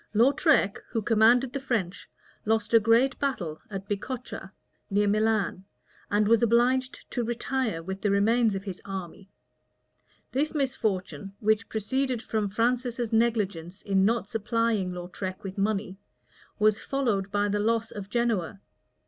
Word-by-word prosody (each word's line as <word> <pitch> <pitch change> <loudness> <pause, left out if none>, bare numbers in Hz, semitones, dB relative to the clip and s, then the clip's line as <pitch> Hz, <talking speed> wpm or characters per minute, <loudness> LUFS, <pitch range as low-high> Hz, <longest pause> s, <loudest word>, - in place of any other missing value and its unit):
Lautrec, 260 - +3
who 225 - -1
commanded 235 +4 +4
the 275 - -2
French, 225 -9 -3 0.3
lost 220 0 0
a 230 - +8
great 230 +5 +3
battle 180 - -2
at 195 -1 -6
Bicocca, 240 +5 -5 0.4
near 205 0 +2
Milan; 210 -3 +1 0.5
and 205 0 +2
was 230 0 +4
obliged 245 +3 +2
to 245 - -1
retire 235 -5 -2
with 190 +2 -5
the 205 - +1
remains 215 +2 +3
of 195 - -4
his 190 -3 -7
army. 190 0 -7 1.0
This 300 +5 0
misfortune, 195 - -2
which 215 0 +1
proceeded 250 +3 -1
from 215 -3 -1
Francis's 240 +1 -1
negligence 205 -6 0
in 195 -1 +2
not 225 +1 +1
supplying 225 -3 0
Lautrec 180 +1 -6
with 195 0 -6
money,[*] 200 -1 -1 0.6
was 215 0 +3
followed 225 -8 -1
by 205 0 +1
the 205 0 0
loss 225 +1 0
of 200 -1 -7
Genoa. 220 -7 -1
215 Hz, 140 wpm, -27 LUFS, 195-235 Hz, 1.0 s, a